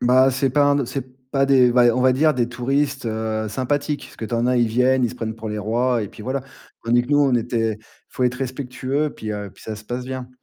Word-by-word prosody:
Ben, 130 +2 +5
c'est 130 +1 0
pas 145 +3 +3
un 145 0 +4
d 140 - 0
c'est 135 +2 -4 0.3
pas 135 -1 +2
des 130 -3 +5
v 120 -1 +5
on 125 - 0
va 130 0 +5
dire 150 +4 +3
des 120 -3 0
touristes, 135 +3 -1
heu, 110 -1 -2
sympathiques. 145 +6 -2
Parce - - -17
que - - -5
tu 120 - -3
en 115 +1 +1
as, 125 0 +2
ils 120 -2 +3
viennent, 125 +3 +3
ils 120 - 0
se - - -9
prennent 110 -2 -4
pour 110 0 -7
les 105 0 -3
rois 120 +3 0
et 105 - -5
puis 105 - -12
voilà. 130 +4 -2 0.4
Tandis 120 +1 +3
que 120 - -10
nous, 145 0 +3
on 140 -3 +3
était 115 -1 0
il 110 +1 -19 0.2
faut - - -4
être 125 0 +1
respectueux. 135 +2 -2
Puis 110 -1 -5
heu, 105 -1 -5
puis - - -18
ça 110 - -5
se 110 - -12
passe 125 +3 -4
bien. 130 -1 -6
125 Hz, 275 wpm, -22 LUFS, 115-135 Hz, 0.4 s, Ben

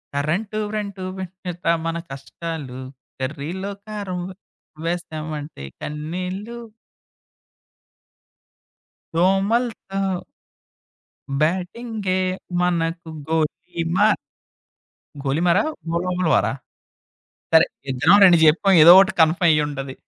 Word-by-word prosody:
Current, 180 +10 -1
వ్రేంటూ 200 -3 -4
పెంచేత్త 185 -1 -7 0.2
మన 165 0 -1
కష్టాలు. 135 -1 -7 0.4
కర్రీలో 155 +9 -4
కారం, 200 -4 -5
వే 185 - -10 0.5
వేస్తామంటే, 155 - -5 0.2
కన్నీళ్ళు. 180 +9 -5 2.6
దోమలుతో 195 0 0 1.2
బ్యాటింగే 185 +3 -1 0.4
మనకు 165 -1 -1 0.2
గోలిమార్. 170 +5 0 1.1
గోలిమార, 170 +7 +2 0.3
గోలోములువారా? 180 -1 +1 1.0
సరే 160 +1 +7 0.3
ఇద్దరం 145 +9 +5
2 175 -2 +7
చెప్పాం, 175 +5 +4
ఏదోకటి 185 +3 +8
కన్ఫ్‌మ్ 170 +2 +3
అయ్యుంటది. 145 -3 0
175 Hz, 70 wpm, -22 LUFS, 155-195 Hz, 2.6 s, ఏదోకటి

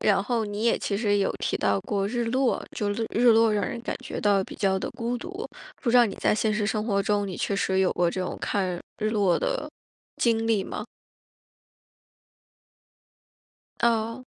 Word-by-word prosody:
然 195 -2 +3
后 225 +2 0
你 205 +1 -4
也 235 - +3
其 200 - -2
实 205 -1 +2
有 195 - +1
提 - - -1
到 100 -1 +1
过 195 - -1
日 240 +3 -1
落， 255 +2 +1
就 210 - -1
略 225 +2 -2
日 240 +2 +2
落 225 -1 +5
让 205 -1 +1
人 240 -3 -4
感 235 - -4
觉 - - -5
到 200 -2 +3
比 - - -10
较 190 -2 +1
地 - - -4
孤 235 +1 -2
独。 380 - -6 0.4
不 240 - +1
知 245 - +5
道 245 - +8
你 200 - -5
在 - - +2
现 215 0 +1
实 210 -1 0
生 215 0 -1
活 200 -3 +1
中， 205 0 +1
你 185 -3 -5
确 200 - -1
实 190 -1 +1
有 190 - +3
过 175 -1 +1
这 185 - -3
种 - - -4
看 185 -3 -1 0.2
日 215 0 0
落 200 -6 +2
的 300 - -2 0.5
经 225 -1 +1
历 220 -4 +2
吗？ - - -5 3.0
哦。 230 +1 +1
210 Hz, 215 characters per minute, -26 LUFS, 200-230 Hz, 3.0 s, 道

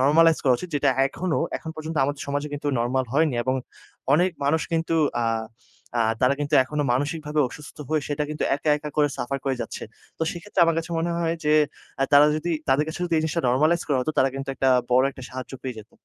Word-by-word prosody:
Normalise 160 +4 +5
করা 130 -2 +5
উচিত। 180 - -7
যেটা 145 - +3 0.2
এখনো 175 +4 -2 0.2
এখন 160 - -7
পর্যন্ত 155 0 -5
আমাদের 145 0 -3
সমাজে 145 +1 -1
কিন্তু 145 0 -5
নরমাল 125 +2 0
হয়নি। 150 -2 +2
এবং 130 +1 0 0.6
অনেক 180 +4 +3
মানুষ 155 +3 +2
কিন্তু 165 0 0 0.3
আ - - 0 0.7
আ - - +3 0.2
তারা 130 +2 +4
কিন্তু 145 +1 0
এখনো 150 +2 -2
মানসিকভাবে 150 +3 -1
অসুস্থ 150 +4 -11
হয়ে 155 -1 +1
সেটা 145 0 -1
কিন্তু 150 - -2
একা, 150 +1 0
একা 150 0 -6
করে 145 -1 +4
সাফার 135 +3 -2
করে 135 -1 +1
যাচ্ছে। 115 - -5 0.4
তো - - -2
সেক্ষেত্রে 180 +1 -3
আমার 165 -1 +1
কাছে 165 +1 -5
মনে 170 +1 -1
হয় 165 -1 0
যে, 150 - +3 0.5
অ্যা 135 - +3
তারা 145 +1 +8
যদি 175 +3 -3 0.2
তাদের 140 +3 +3
কাছে 160 - -6
যদি 170 - -1
এই - - 0
জিনিসটা 160 0 -1
নরমালাইজ 155 +7 +3
করা 140 -3 +2
হতো 125 - -1
তারা 135 - +5
কিন্তু 135 0 -5
একটা 135 - +1 0.2
বড় 130 +2 +5
একটা 130 - -12
সাহায্য 130 0 -7
পেয়ে 130 -3 -5
যেত। 110 0 -12
150 Hz, 215 wpm, -24 LUFS, 135-160 Hz, 0.7 s, তারা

